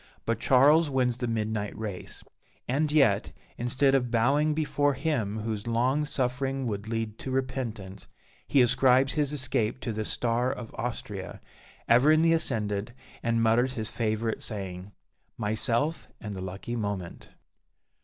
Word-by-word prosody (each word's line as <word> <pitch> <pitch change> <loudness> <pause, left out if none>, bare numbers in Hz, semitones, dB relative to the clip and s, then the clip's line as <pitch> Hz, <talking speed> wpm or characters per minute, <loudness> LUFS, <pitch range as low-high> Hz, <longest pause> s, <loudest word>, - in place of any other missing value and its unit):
But 115 -1 0
Charles 145 +6 +5
wins 125 -3 +1
the 125 - -2
midnight 110 -2 -2
race; 105 -4 -6 0.4
and 150 +4 +1
yet, 135 -10 +3 0.2
instead 130 +3 +2
of 125 -3 +2
bowing 140 +6 +2
before 145 -2 +1
Him 125 -8 -1
whose 110 -1 -4
"long 125 +6 +1
suffering 135 0 -1
would 105 -2 -3
lead 115 -1 -3
to - - -5
repentance," 125 -7 -3 0.4
he 135 - +5
ascribes 130 +2 +4
his 150 -2 0
escape 130 -5 -1
to 115 - -3
the 110 +1 -2
"star 120 +3 0
of 120 -4 -7
Austria," 105 -5 -5 0.5
ever 125 +6 +6
in 155 +1 +4
the 165 0 +5
ascendant, 110 -8 -1 0.3
and 115 -1 +1
mutters 120 +3 +3
his 110 -4 -2
favourite 110 0 -1
saying, 95 -2 -6 0.5
"Myself, 115 +8 -1
and 105 -2 -6
the 95 - -6
lucky 95 +6 -5
moment." 100 -6 -4
120 Hz, 145 wpm, -28 LUFS, 110-135 Hz, 0.5 s, ever